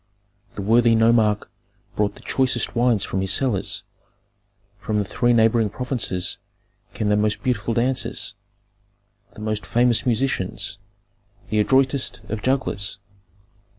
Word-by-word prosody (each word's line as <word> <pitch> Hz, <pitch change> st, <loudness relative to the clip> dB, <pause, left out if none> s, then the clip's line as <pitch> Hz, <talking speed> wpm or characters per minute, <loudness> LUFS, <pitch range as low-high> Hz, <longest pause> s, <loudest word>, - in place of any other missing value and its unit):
The 100 Hz, -, -4 dB
worthy 115 Hz, +2 st, +4 dB
nomarch 110 Hz, -2 st, +3 dB, 0.5 s
brought 105 Hz, -1 st, 0 dB
the -, -, -15 dB
choicest 130 Hz, -1 st, 0 dB
wines 120 Hz, -4 st, +3 dB
from 95 Hz, -, -2 dB
his 95 Hz, 0 st, +1 dB
cellars; 120 Hz, -4 st, 0 dB, 1.0 s
from 105 Hz, +1 st, -2 dB
the 105 Hz, -, 0 dB
three 120 Hz, +5 st, +1 dB
neighboring 115 Hz, -1 st, +3 dB
provinces 115 Hz, -6 st, -2 dB, 0.6 s
came 105 Hz, -, -1 dB
the 105 Hz, -, +3 dB
most 105 Hz, 0 st, 0 dB
beautiful 115 Hz, -3 st, -1 dB
dancers, 125 Hz, -2 st, 0 dB, 1.0 s
the -, -, -10 dB
most 110 Hz, -1 st, -2 dB
famous 120 Hz, +3 st, +2 dB
musicians, 110 Hz, -5 st, -1 dB, 0.7 s
the 110 Hz, -, +1 dB
adroitest 130 Hz, +3 st, +1 dB
of 110 Hz, 0 st, -3 dB
jugglers. 100 Hz, -7 st, -1 dB
110 Hz, 120 wpm, -22 LUFS, 105-125 Hz, 1.0 s, worthy